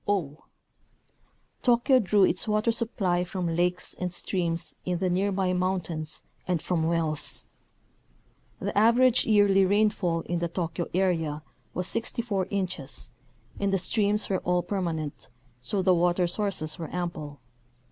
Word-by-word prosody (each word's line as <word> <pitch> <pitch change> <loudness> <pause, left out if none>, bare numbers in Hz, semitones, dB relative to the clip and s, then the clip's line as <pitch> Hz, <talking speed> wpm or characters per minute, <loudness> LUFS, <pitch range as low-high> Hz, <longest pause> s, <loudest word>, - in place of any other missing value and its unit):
o. 165 -7 -1 1.2
Tokyo 245 +2 +4
drew 205 -2 +3
its 185 +2 +2
water 215 +2 +2
supply 195 -6 0
from 180 -2 -3
lakes 180 +1 +1
and 180 -1 -2
streams 170 -2 -2
in 180 -1 -1
the 185 0 0
near 195 +3 +1
by 185 -1 0
mountains 175 -4 -2 0.2
and 180 -2 +1
from 170 +1 -1
wells. 165 -3 -1 1.1
The - - -3
average 235 +4 +5
yearly 205 -3 +5
rainfall 190 -4 +2
in 175 0 -2
the 170 - 0
Tokyo 170 0 -3
area 165 -5 0 0.3
was 180 - -1
64 225 -3 -1
inches 185 -8 -4 0.5
and 200 -1 +1
the 195 - +3
streams 210 +3 +1
were 190 -2 0
all 180 0 0
permanent, 165 -9 -3 0.3
so 190 - -1
the 185 0 +5
water 175 +1 +2
sources 175 -4 -2
were 160 - -5
ample. 155 -5 -4
180 Hz, 135 wpm, -27 LUFS, 170-200 Hz, 1.2 s, average